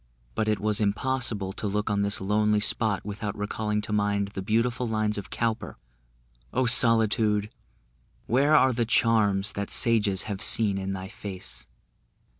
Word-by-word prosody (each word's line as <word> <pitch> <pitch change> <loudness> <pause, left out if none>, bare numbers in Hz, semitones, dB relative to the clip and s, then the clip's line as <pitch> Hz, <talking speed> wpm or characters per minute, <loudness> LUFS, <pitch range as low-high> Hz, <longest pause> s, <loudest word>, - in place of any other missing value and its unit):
But 110 - -2
it 105 -2 0
was 105 +1 0
impossible 105 -2 -1
to 105 - -4
look 105 +1 -2
on 100 0 0
this 100 0 +1
lonely 105 +2 +1
spot 105 -1 0
without 105 0 -5
recalling 105 +1 -3
to 105 0 -5
mind 100 -1 0
the 95 - -6
beautiful 115 +4 -1
lines 110 -1 -1
of 100 - -7
Cowper 115 -2 -3 0.7
"O 130 0 0
Solitude, 110 -3 +3 0.7
where 140 +6 +2
are 130 -3 +4
the 120 0 0
charms 110 -3 +1
That 100 0 -5
sages 105 -5 +3
have 100 -2 -6
seen 105 -2 +3
in 95 0 -4
thy 95 0 -6
face?" 95 -1 -7
105 Hz, 155 wpm, -26 LUFS, 100-115 Hz, 0.7 s, are